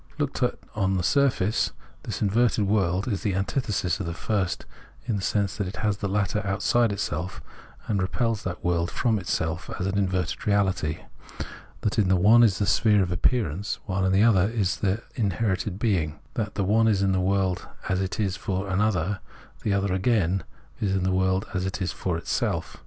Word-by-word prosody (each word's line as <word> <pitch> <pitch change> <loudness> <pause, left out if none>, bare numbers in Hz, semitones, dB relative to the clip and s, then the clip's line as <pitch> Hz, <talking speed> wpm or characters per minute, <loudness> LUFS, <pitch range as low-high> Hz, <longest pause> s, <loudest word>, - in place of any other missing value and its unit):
Looked 145 -3 -2
at 125 - +1 0.2
on 95 -3 +1
the 90 - -1
surface, 115 -2 +2 0.3
this - - -4
inverted 110 +1 +2
world 95 -2 +1
is 100 -6 -1
the 100 -4 0
antithesis 95 -3 -1
of 95 - -3
the 85 - -4
first 95 -2 -1 0.4
in 115 -3 -1
the 100 - -2
sense 100 -1 0
that 100 -4 -1
it 95 - -6
has 105 -2 0
the 100 - -2
latter 100 +1 0
outside 105 +4 +2
itself, 90 -3 -3 0.5
and 100 -3 +1
repels 110 +3 0
that 90 -3 -5
world 85 -1 +1
from 115 -3 +1
itself 85 -1 -2
as 90 - -1
an 100 +1 0
inverted 90 -4 -1
reahty; 95 -7 0 0.8
that 105 - 0
the 95 -4 +3
one 105 +6 +6
is 110 -5 +4
the 100 - +1
sphere 105 +1 +4
of 90 - -3
ap 90 - -3
pearance, 105 - 0
while 95 -1 0
the 95 +2 +4
other 100 -4 +4
is 105 -5 0
the 100 +2 0
inherent 100 -3 -1
being; 90 -9 0
that 105 -2 -3
the 100 - 0
one 110 +4 +3
is 100 -3 +3
the 95 -1 +2
world 95 -1 0 0.2
as 95 0 0
it 95 +1 -3
is 100 -4 0
for 95 0 -3
an 95 +2 +1
other, 100 -2 +1 0.4
the 105 - -1
other 100 -1 +1
again 95 -3 +1 0.4
the 95 -2 +1
world 95 +1 +1
as 90 -1 -1
it 95 +1 -3
is 90 -4 -1
for 90 -3 -2
itself. 85 - -2
95 Hz, 190 wpm, -26 LUFS, 95-105 Hz, 0.8 s, one